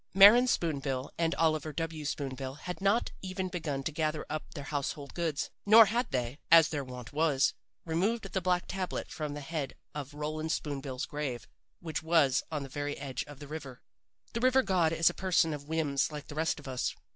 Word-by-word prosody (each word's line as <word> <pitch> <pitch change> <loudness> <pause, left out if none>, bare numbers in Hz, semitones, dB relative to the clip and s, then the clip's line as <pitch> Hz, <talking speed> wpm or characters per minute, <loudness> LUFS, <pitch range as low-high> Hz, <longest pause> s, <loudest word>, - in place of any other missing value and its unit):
Maren 210 +6 +9
Spoon 165 - +1
bill 135 -1 -3
and 165 0 +1
Oliver 155 -1 +1
W. 160 -1 -4
Spoon 140 -2 -2
bill 130 0 -5
had 180 +5 -6
not 200 +4 +2
even 185 0 -3
begun 155 -6 -3
to 160 - -2
gather 155 0 -1
up 155 - -5
their 145 - -5
household 145 -1 -4
goods, 165 -4 -2
nor 220 +2 +9
had 235 +4 0
they, 125 0 -2
as 165 -1 +8
their 145 -3 -2
wont 125 -2 -9
was, 150 -3 +3 0.3
removed 195 +8 0
the 190 - 0
black 180 0 +1
tablet 185 -1 -3
from 150 -2 -4
the 145 - -6
head 145 -1 -4 0.2
of 145 -1 -6
Roland 155 +1 -3
Spoon 145 -4 -2
bill's 135 -1 -4
grave, 145 -5 -4 0.3
which 160 -3 -3
was 160 -5 +3
on 150 -3 -2
the - - -6
very 145 +2 -3
edge 135 -3 -4
of 145 -1 -11
the 145 +1 -10
river. 140 -4 -8 0.5
"The 230 - -1
river 255 +2 +4
god 180 -5 +2
is 165 0 +4
a - - -15
person 175 -4 +2
of 145 -1 -7
whims 155 -3 0
like 150 -1 -7
the - - -6
rest 160 +1 0
of 145 - -11
us. 130 -1 -2
155 Hz, 205 wpm, -31 LUFS, 140-170 Hz, 0.5 s, Maren